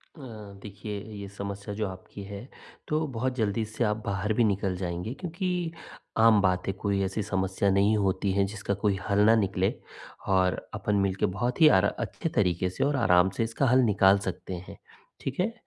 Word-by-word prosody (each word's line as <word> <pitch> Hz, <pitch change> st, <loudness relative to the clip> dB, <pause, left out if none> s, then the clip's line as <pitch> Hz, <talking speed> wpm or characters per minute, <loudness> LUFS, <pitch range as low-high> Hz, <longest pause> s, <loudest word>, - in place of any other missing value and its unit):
अ, -, -, -15 dB, 0.4 s
देखिए, 105 Hz, 0 st, -6 dB
ये 100 Hz, -1 st, -7 dB
समस्या 100 Hz, +1 st, -6 dB
जो 105 Hz, -1 st, -1 dB
आपकी 95 Hz, +2 st, -9 dB
है 100 Hz, +4 st, -8 dB, 0.4 s
तो 155 Hz, +1 st, 0 dB
बहुत 130 Hz, +2 st, -1 dB
जल्दी 110 Hz, -2 st, 0 dB
इससे 110 Hz, +2 st, -2 dB
आप 105 Hz, -1 st, +1 dB
बाहर 100 Hz, +2 st, -1 dB
भी 120 Hz, -, +3 dB
निकल 100 Hz, -3 st, 0 dB
जाएँगे 90 Hz, +4 st, -3 dB
क्योंकि 175 Hz, +2 st, -3 dB, 0.5 s
आम 110 Hz, -1 st, +6 dB
बात 90 Hz, -1 st, +1 dB
है, 95 Hz, -, 0 dB
कोई 100 Hz, 0 st, -1 dB
ऐसी 95 Hz, +2 st, -2 dB
समस्या 95 Hz, -1 st, 0 dB
नहीं 100 Hz, +3 st, +3 dB
होती 100 Hz, -1 st, 0 dB
है 100 Hz, 0 st, +2 dB
जिसका 100 Hz, 0 st, -3 dB
कोई 100 Hz, 0 st, 0 dB
हल 100 Hz, -, +2 dB
ना 110 Hz, +1 st, +6 dB
निकले। 95 Hz, -3 st, +1 dB, 0.5 s
और 95 Hz, -1 st, +3 dB, 0.2 s
अपन 105 Hz, 0 st, -1 dB
मिलके 95 Hz, +1 st, 0 dB
बहुत 115 Hz, -, -2 dB
ही 155 Hz, -, +9 dB
अर 95 Hz, 0 st, +5 dB
अच्छे 165 Hz, -, -3 dB
तरीके 90 Hz, -2 st, +2 dB
से 95 Hz, -, -2 dB
और 140 Hz, +1 st, +1 dB
आराम 95 Hz, -6 st, +4 dB
से -, -, +2 dB
इसका 115 Hz, +5 st, -1 dB
हल 130 Hz, +2 st, +5 dB
निकाल 100 Hz, -3 st, +5 dB
सकते 95 Hz, -1 st, -5 dB
हैं, -, -, -10 dB, 0.4 s
ठीक 135 Hz, +3 st, -4 dB
है? 215 Hz, +6 st, +1 dB
100 Hz, 190 wpm, -27 LUFS, 95-115 Hz, 0.5 s, ही